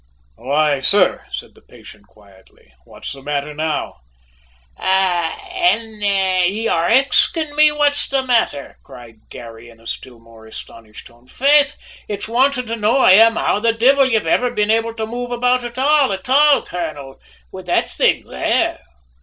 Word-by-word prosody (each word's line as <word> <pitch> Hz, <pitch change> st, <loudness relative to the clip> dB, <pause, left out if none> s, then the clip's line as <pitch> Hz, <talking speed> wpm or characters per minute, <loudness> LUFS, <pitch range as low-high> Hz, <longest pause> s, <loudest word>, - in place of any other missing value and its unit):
"Why, 145 Hz, +2 st, 0 dB
sir," 185 Hz, +8 st, +1 dB
said -, -, -8 dB
the -, -, -22 dB
patient 105 Hz, -1 st, -17 dB
quietly, 95 Hz, -10 st, -23 dB
"what's -, -, -9 dB
the 135 Hz, -, -12 dB
matter 145 Hz, +1 st, -4 dB
now?" 155 Hz, 0 st, -4 dB, 0.8 s
"Ah, 180 Hz, -, 0 dB
an' 230 Hz, -, -1 dB
ye 195 Hz, +1 st, 0 dB
are 165 Hz, -5 st, 0 dB
axin' 275 Hz, +5 st, +2 dB, 0.3 s
what's 290 Hz, -1 st, +1 dB
the 270 Hz, -1 st, 0 dB
mather?" 230 Hz, -, -1 dB
cried 115 Hz, -3 st, -16 dB
Garry 115 Hz, 0 st, -12 dB
in 115 Hz, -1 st, -19 dB
a 115 Hz, -, -22 dB
still 120 Hz, +1 st, -8 dB
more 115 Hz, -1 st, -18 dB
astonished 110 Hz, 0 st, -12 dB
tone. 120 Hz, +1 st, -20 dB
"Faith, 285 Hz, -, +2 dB, 0.3 s
it's 205 Hz, 0 st, -5 dB
wantin' 250 Hz, +2 st, +1 dB
to 230 Hz, 0 st, -4 dB
know 225 Hz, +3 st, +1 dB
I 260 Hz, -, +5 dB
am 225 Hz, +4 st, +6 dB
how -, -, 0 dB
the 230 Hz, +1 st, +1 dB
divvle 265 Hz, +4 st, +3 dB
you've 225 Hz, -6 st, 0 dB
iver 245 Hz, +9 st, +1 dB
been 210 Hz, -3 st, -1 dB
able 225 Hz, 0 st, -1 dB
to 220 Hz, -1 st, -4 dB
move 245 Hz, +2 st, -6 dB
about 250 Hz, +1 st, 0 dB
at 240 Hz, +1 st, -8 dB
all, 280 Hz, -1 st, +2 dB
at 190 Hz, +2 st, -6 dB
all, 285 Hz, +2 st, +4 dB
colonel, 150 Hz, -6 st, -7 dB, 0.3 s
with 185 Hz, -1 st, -11 dB
that 175 Hz, -, 0 dB
thing -, -, 0 dB
there. 65 Hz, -, -1 dB
205 Hz, 160 wpm, -18 LUFS, -, 0.8 s, am